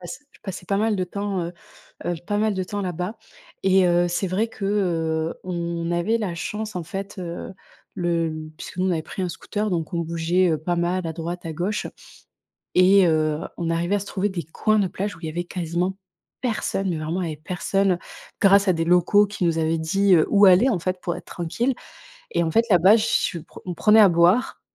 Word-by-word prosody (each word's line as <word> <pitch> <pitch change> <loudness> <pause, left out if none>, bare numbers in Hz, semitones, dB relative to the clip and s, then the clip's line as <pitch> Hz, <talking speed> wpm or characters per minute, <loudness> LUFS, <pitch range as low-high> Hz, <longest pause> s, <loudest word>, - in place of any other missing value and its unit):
passe 175 - -7
je - - -22
passais 185 -2 -7
pas 195 - 0
mal 215 +1 +1
de 185 - 0
temps, 200 +1 -3
heu 170 - -5 0.5
heu, 175 - -1
pas 205 - -1
mal 215 0 +2
de 190 - -1
temps 205 +2 -4
là-bas 180 +4 -3 0.5
et 190 -1 +4
heu, 175 0 +3
c'est 175 +3 -1
vrai 200 +5 0
que, 210 - -7
heu, 165 -5 0
on 170 -2 -3
avait 175 +7 +1
la 195 -6 -3
chance, 210 +4 -4
en 175 - -2
fait, 195 +5 -6
heu, 175 +1 -6 0.4
le 170 -2 0 0.2
Puisque - - -9
nous, 185 - +1
on - - +1
avait 165 -3 0
pris 185 +4 -6
un 180 - -1
scooter, 205 +4 -3
donc 170 0 -2
on 170 - 0
bougeait, 170 +2 +1
heu, 155 - 0
pas 175 +3 -2
mal 175 +1 0
à 160 - -3
droite, 170 +1 -5
à 160 - -4
gauche. 185 +7 -2 0.9
Et 185 0 +6
heu, 155 -1 +1 0.2
on 170 -1 -2
arrivait 175 +4 0
à - - +1
se 195 - -7
trouver 200 0 -1
des 180 -3 -4
coins 215 +7 0
de 195 - +2
plage 200 +3 -4
où - - -16
il - - -5
y - - -3
avait 170 +3 -3
quasiment 175 +2 -2 0.4
personne. 215 -5 -1
Mais 165 - -2
vraiment, 160 +4 -2
il 165 - -2
y - - -3
avait 150 - -13
personne, 185 +1 0 0.4
grâce 200 0 +5
à 185 - +5
des 165 0 -1
locaux 180 +4 +4
qui 205 -2 -5
nous 165 -1 +2
avaient 160 0 +1
dit, 195 +5 +2
heu, 160 - +4
où 205 0 +6
aller, 190 +8 +6
en 220 - +1
fait, 185 +1 -2
pour 175 -1 -2
être 175 0 -10
tranquilles. 230 +10 -2 0.6
Et 170 - +1
en 165 - -1
fait, 230 +6 +3
là-bas, 190 +3 +6
je 215 - 0
suis 180 -6 0
pr 170 - -14
on 180 - -3
prenait 215 +5 +5
à 200 - +7
boire, 175 +9 +3
180 Hz, 230 wpm, -23 LUFS, 170-200 Hz, 0.9 s, à